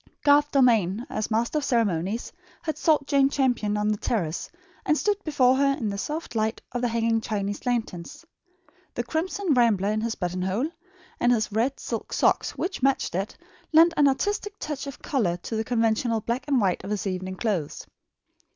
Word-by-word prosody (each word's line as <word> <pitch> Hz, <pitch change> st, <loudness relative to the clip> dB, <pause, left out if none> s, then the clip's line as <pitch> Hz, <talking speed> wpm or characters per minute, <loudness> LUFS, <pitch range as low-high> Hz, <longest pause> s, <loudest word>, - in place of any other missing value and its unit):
Garth 290 Hz, 0 st, +5 dB
Dalmain, 235 Hz, -, +3 dB
as 215 Hz, -, -2 dB
master 235 Hz, +7 st, +1 dB
of -, -, -6 dB
ceremonies, 220 Hz, -, 0 dB, 0.3 s
had 315 Hz, -2 st, -2 dB
sought 305 Hz, -3 st, +2 dB
Jane 275 Hz, -1 st, +3 dB
Champion 245 Hz, -7 st, +1 dB
on 210 Hz, 0 st, +1 dB
the 210 Hz, -1 st, 0 dB
terrace, 175 Hz, -8 st, -2 dB, 0.3 s
and 305 Hz, -, +2 dB
stood 410 Hz, +2 st, 0 dB
before 260 Hz, -4 st, +3 dB
her 275 Hz, 0 st, +2 dB
in 220 Hz, -, -2 dB
the 200 Hz, -, -4 dB
soft 310 Hz, +7 st, -4 dB
light 220 Hz, -1 st, 0 dB
of 245 Hz, -, -3 dB
the 245 Hz, -, +2 dB
hanging 230 Hz, -1 st, +1 dB
Chinese 205 Hz, 0 st, -3 dB
lanterns. 240 Hz, -, -3 dB, 0.7 s
The 240 Hz, -, -1 dB
crimson 335 Hz, +6 st, -1 dB
rambler 215 Hz, -5 st, +3 dB
in 215 Hz, 0 st, -1 dB
his 230 Hz, 0 st, -2 dB
button 180 Hz, 0 st, -3 dB
hole, 205 Hz, -, -1 dB, 0.5 s
and 240 Hz, -, +3 dB
his 215 Hz, -3 st, +1 dB
red 235 Hz, +6 st, 0 dB
silk 230 Hz, -2 st, -5 dB
socks, -, -, +1 dB
which 365 Hz, -4 st, -3 dB
matched 270 Hz, 0 st, +1 dB
it, 195 Hz, +4 st, -3 dB, 0.3 s
lent 330 Hz, +2 st, +6 dB
an 290 Hz, -, +5 dB
artistic 410 Hz, +8 st, -1 dB
touch 290 Hz, -2 st, -5 dB
of 275 Hz, -, -9 dB
colour 200 Hz, -, 0 dB
to 200 Hz, +5 st, -6 dB
the 220 Hz, -, 0 dB
conventional 225 Hz, -1 st, +1 dB
black 235 Hz, +5 st, -2 dB
and 275 Hz, -3 st, +3 dB
white 190 Hz, -5 st, 0 dB
of 195 Hz, -, -6 dB
his 210 Hz, -2 st, -2 dB
evening 185 Hz, -1 st, -3 dB
clothes. 185 Hz, -8 st, -2 dB
235 Hz, 185 wpm, -25 LUFS, 210-280 Hz, 0.7 s, lent